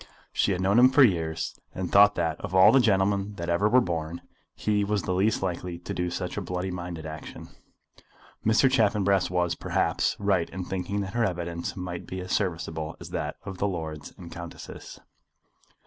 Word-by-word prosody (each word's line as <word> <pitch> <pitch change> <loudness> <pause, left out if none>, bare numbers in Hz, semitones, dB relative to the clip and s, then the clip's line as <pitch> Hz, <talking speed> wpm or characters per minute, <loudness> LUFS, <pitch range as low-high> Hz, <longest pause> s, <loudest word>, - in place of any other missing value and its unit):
She - - +2
had 90 -1 -1
known 100 +5 +4
him 125 +1 +8
for 135 +1 +6
years, 80 -8 0 0.2
and 90 -2 -3
thought 100 +1 +7
that, 80 -2 -1
of 95 - -4
all 95 - +8
the 135 - +6
gentlemen 100 -2 +2
that 85 -2 -5
ever 100 +5 +2
were 125 +3 +6
born, 85 -3 -3 0.3
he 105 -1 +1
was 100 -2 0
the 90 - -1
least 100 +3 +1
likely 90 -1 -3
to 85 - -6
do 90 0 -1
such 90 +2 -4
a - - -1
bloody 90 0 -3
minded 85 -3 -6
action. 80 0 -8 0.9
Mr. 110 +5 +4
Chaffanbrass 100 -6 +2
was, 90 -1 +1
perhaps, - - 0
right 100 -4 +1
in 95 -1 -5
thinking 95 +2 -2
that 95 -1 -5
her 120 - +1
evidence 85 -3 -3
might 90 -1 -6
be 95 - -5
as 90 0 -6
serviceable 80 -5 -2
as - - -10
that - - -3
of 95 -1 -7
the 100 - +1
lords 80 -5 -5
and 85 -2 -10
countesses. 85 -1 -9
90 Hz, 190 wpm, -27 LUFS, 85-100 Hz, 0.9 s, him